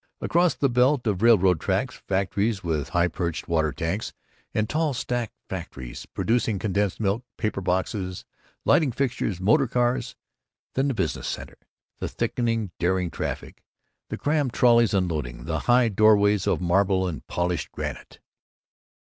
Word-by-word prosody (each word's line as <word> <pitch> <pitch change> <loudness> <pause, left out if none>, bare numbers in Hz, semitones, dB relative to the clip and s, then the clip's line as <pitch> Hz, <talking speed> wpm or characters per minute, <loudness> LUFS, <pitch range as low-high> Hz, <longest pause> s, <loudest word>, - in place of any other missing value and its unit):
Across 175 0 +2
the 140 - +2
belt 125 +1 +2
of 100 -4 0
railroad 95 -7 +5
tracks, - - -1
factories 100 +2 0
with 80 -5 -1
high 85 0 +2
perched 85 -1 -3
water 80 -3 +1
tanks 85 +9 -3 0.4
and 110 0 0
tall 155 0 0
stacks 120 -2 -3
factories 65 -2 -7
producing 115 -2 0
condensed 100 -1 -1
milk, 105 +3 0
paper 105 -3 -2
boxes, 95 0 -2 0.4
lighting 150 -6 +4
fixtures, 120 -7 -1
motor 130 +9 +3
cars. 125 +1 0 0.6
Then 135 +2 +1
the 135 - -1
business 95 -7 -2
center, - - -6 0.4
the - - -2
thickening 115 -5 -1
darting 90 0 +1
traffic, - - -5 0.5
the - - -4
crammed 145 -4 0
trolleys 115 -3 +4
unloading, 80 -10 -1
and - - -10
high 120 +10 +3
doorways 105 -1 +4
of - - +2
marble 95 +1 +2
and 80 -4 -5
polished 85 -2 -2
granite. - - -6
100 Hz, 140 wpm, -25 LUFS, 90-120 Hz, 0.6 s, railroad